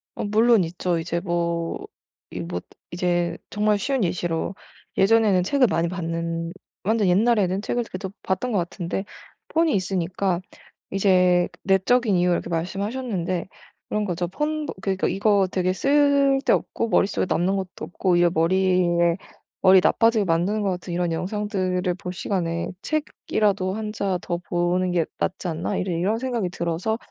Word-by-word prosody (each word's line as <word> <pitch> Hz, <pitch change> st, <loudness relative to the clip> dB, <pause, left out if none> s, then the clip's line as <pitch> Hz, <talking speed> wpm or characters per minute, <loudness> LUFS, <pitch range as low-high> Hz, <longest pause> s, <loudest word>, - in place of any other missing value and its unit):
어 -, -, -4 dB
물론 220 Hz, 0 st, +4 dB
있죠. 175 Hz, 0 st, -1 dB
이제 170 Hz, +1 st, -2 dB
뭐 170 Hz, -2 st, -2 dB, 0.5 s
이 -, -, -6 dB
뭐 90 Hz, +1 st, -4 dB, 0.3 s
이제 175 Hz, -1 st, 0 dB
정말 210 Hz, 0 st, +2 dB
쉬운 260 Hz, +3 st, 0 dB
예시로 175 Hz, 0 st, -1 dB, 0.4 s
예전에는 200 Hz, -2 st, +4 dB
책을 265 Hz, +3 st, +3 dB
많이 170 Hz, -2 st, +1 dB
봤는 165 Hz, -1 st, -3 dB, 0.3 s
완전 215 Hz, 0 st, +2 dB
옛날에는 195 Hz, 0 st, +3 dB
책을 240 Hz, +2 st, -1 dB
그래도 185 Hz, 0 st, -5 dB
봤던 215 Hz, +7 st, -1 dB
것 210 Hz, -, +1 dB
같은데 175 Hz, +2 st, -3 dB, 0.4 s
폰이 325 Hz, -1 st, +2 dB
있으니까 185 Hz, -1 st, -1 dB, 0.5 s
이제 180 Hz, -2 st, +3 dB, 0.2 s
내적인 200 Hz, +3 st, +3 dB
이유를 175 Hz, 0 st, +3 dB
이렇게 -, -, -6 dB
말씀하셨는데 185 Hz, +1 st, -2 dB, 0.4 s
그런 210 Hz, 0 st, -1 dB
거죠. 175 Hz, -1 st, -2 dB
폰 300 Hz, -, -2 dB, 0.2 s
그러니깐 190 Hz, -1 st, 0 dB
이거 200 Hz, 0 st, +3 dB
되게 185 Hz, 0 st, +1 dB
쓸데없고 275 Hz, -1 st, +2 dB
머릿속에 195 Hz, 0 st, +2 dB
남는 185 Hz, +3 st, +1 dB
것도 190 Hz, -1 st, -5 dB
없고 180 Hz, 0 st, 0 dB
이게 175 Hz, 0 st, +4 dB
머리에 175 Hz, 0 st, +3 dB, 0.5 s
머리 190 Hz, 0 st, +7 dB
나빠지게 225 Hz, -2 st, +3 dB
만드는 180 Hz, +5 st, +1 dB
것 195 Hz, -, +1 dB
같은 180 Hz, 0 st, -5 dB
이런 175 Hz, -1 st, 0 dB
영상들을 185 Hz, -1 st, -1 dB
볼 180 Hz, -1 st, -6 dB
시간에 170 Hz, -2 st, -2 dB
'책이라도 205 Hz, -10 st, -1 dB
1 215 Hz, -1 st, -4 dB
자 195 Hz, -4 st, -1 dB
더 175 Hz, -1 st, -2 dB
보는 175 Hz, +1 st, 0 dB
게 170 Hz, -2 st, +1 dB
낫지 185 Hz, 0 st, -2 dB
않나?' 160 Hz, 0 st, -2 dB
이제 185 Hz, -, -2 dB
이런 185 Hz, +6 st, 0 dB
생각이 235 Hz, -7 st, -2 dB
들어서 170 Hz, +6 st, -2 dB
185 Hz, 325 characters per minute, -24 LUFS, 175-210 Hz, 0.5 s, 머리